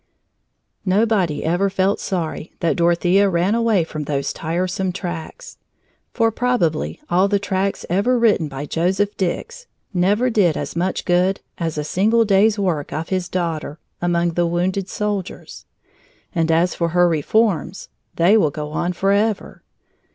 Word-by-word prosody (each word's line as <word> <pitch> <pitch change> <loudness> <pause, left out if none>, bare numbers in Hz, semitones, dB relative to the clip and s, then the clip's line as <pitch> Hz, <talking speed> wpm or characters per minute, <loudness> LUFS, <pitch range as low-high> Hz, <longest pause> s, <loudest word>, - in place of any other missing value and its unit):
Nobody 190 -6 +1
ever 175 +5 +1
felt 195 +1 +1
sorry 170 -4 -4
that 170 - +1
Dorothea 175 +3 +3
ran 180 +3 +1
away 230 -6 +2
from 155 -2 -6
those 140 -1 -2
tiresome 180 +3 -2
tracts. 180 - -7 0.5
For 225 -1 +1
probably 225 - 0
all 185 -1 +3
the 200 0 +2
tracts 195 0 -2
ever 205 +8 +2
written 215 -9 +3
by 140 0 -6
Joseph 190 +6 0
Dix 470 - -3 0.3
never 205 +7 +2
did 190 -8 +2
as - - -5
much 180 +2 -1
good 180 +2 +2 0.2
as 165 -3 -2
a 150 - -1
single 220 +9 +2
day's 205 +2 +3
work 175 -8 -1
of 160 +2 -4
his 185 -2 -2
daughter, 165 -4 -3 0.2
among 175 0 +1
the 175 +1 0
wounded 185 +3 -1
soldiers. 205 -3 -4 0.7
And 165 -3 +1
as 170 +2 +2
for 170 - -1
her 175 +1 +3
reforms 175 +2 0 0.3
they 180 +6 +4
will 160 -8 +3
go 150 0 -6
on 175 +3 -1
forever. 200 +3 0
180 Hz, 145 wpm, -20 LUFS, 170-205 Hz, 0.7 s, they